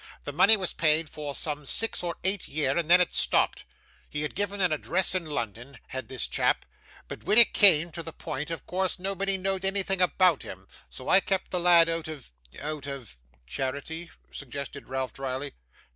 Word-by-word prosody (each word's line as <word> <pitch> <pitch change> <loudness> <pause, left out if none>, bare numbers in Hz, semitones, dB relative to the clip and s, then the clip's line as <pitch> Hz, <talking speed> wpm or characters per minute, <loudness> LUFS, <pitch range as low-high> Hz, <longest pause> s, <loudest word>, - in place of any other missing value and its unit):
'The 145 - -6
money 200 +8 +6
was 185 -3 -3
paid 155 0 +2
for 145 -2 -5
some 150 -1 -2
six 225 +10 +1
or 170 -1 -3
eight 190 +1 0
year, 140 -2 0
and 170 -2 -1
then 180 +1 +7
it 180 - +1
stopped. - - +1 0.4
He 150 0 -3
had 150 - -4
given 205 +1 -3
an 180 -3 +2
address 175 +5 +1
in 180 -3 -2
London, 120 -1 -5
had 130 0 -5
this 130 -2 -1
chap; - - 0 0.4
but - - -9
when 210 - +2
it 235 - +8
came 170 -5 +6
to 170 - -6
the 165 0 -7
point, 150 +1 -5
of 165 - -6
course 185 0 -1
nobody 195 +1 -1
knowed 190 0 -1
anything 195 -1 0
about 180 -3 +3
him. - - -10 0.2
So - - -11
I - - +6
kept 190 -1 -2
the 180 - 0
lad 170 -1 +6
out 165 -1 -2
of 145 - -9 0.3
out 150 -1 -5
of 130 - -8
' - - -34
'Charity?' 140 - -5 0.2
suggested 140 +1 -7
Ralph 130 -1 -3
drily. 135 +1 -4
165 Hz, 195 wpm, -27 LUFS, 140-185 Hz, 0.4 s, it